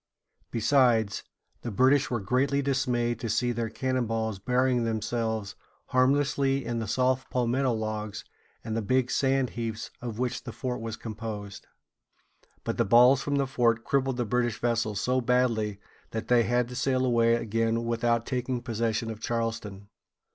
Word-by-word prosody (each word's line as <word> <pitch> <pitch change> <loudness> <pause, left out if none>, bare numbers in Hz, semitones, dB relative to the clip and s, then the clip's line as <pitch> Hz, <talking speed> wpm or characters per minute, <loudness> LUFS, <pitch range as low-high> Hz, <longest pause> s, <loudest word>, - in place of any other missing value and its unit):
Besides, 115 -3 +2 0.4
the 120 - -4
British 130 +6 +3
were 120 - -1
greatly 135 +7 +1
dismayed 125 -4 0
to 115 - -4
see 120 +3 +1
their 115 -1 -2
cannon 130 +1 -1
balls 110 -2 -2
burying 125 +3 +1
themselves 110 -1 -2 0.4
harmlessly 135 0 +2
in 120 -1 -2
the 110 - -3
soft 130 +3 +1
palmetto 125 +1 +1
logs 110 -2 -4 0.4
and 110 -1 -4
the 115 - 0
big 125 +4 +1
sand 135 -2 +1
heaps 115 -1 -4
of 120 -3 -5
which 125 0 -2
the 120 - -6
fort 125 -1 -4
was 115 -1 -5
composed. 110 -2 -7 1.0
But - - -3
the - - +3
balls 125 +6 +6
from 145 0 -1
the 140 -1 +2
fort 120 -3 +1
crippled 135 -2 0
the 120 - 0
British 120 0 0
vessels 115 -4 0
so 130 +3 +1
badly 115 -4 +1 0.3
that 110 0 -5
they 120 -2 +4
had 120 0 +1
to 125 - -7
sail 130 0 +1
away 115 -2 +3
again 115 0 0
without 115 0 +1
taking 125 -1 -2
possession 115 -1 -1
of 110 - -8
Charleston. 115 -4 -3
120 Hz, 160 wpm, -28 LUFS, 110-130 Hz, 1.0 s, balls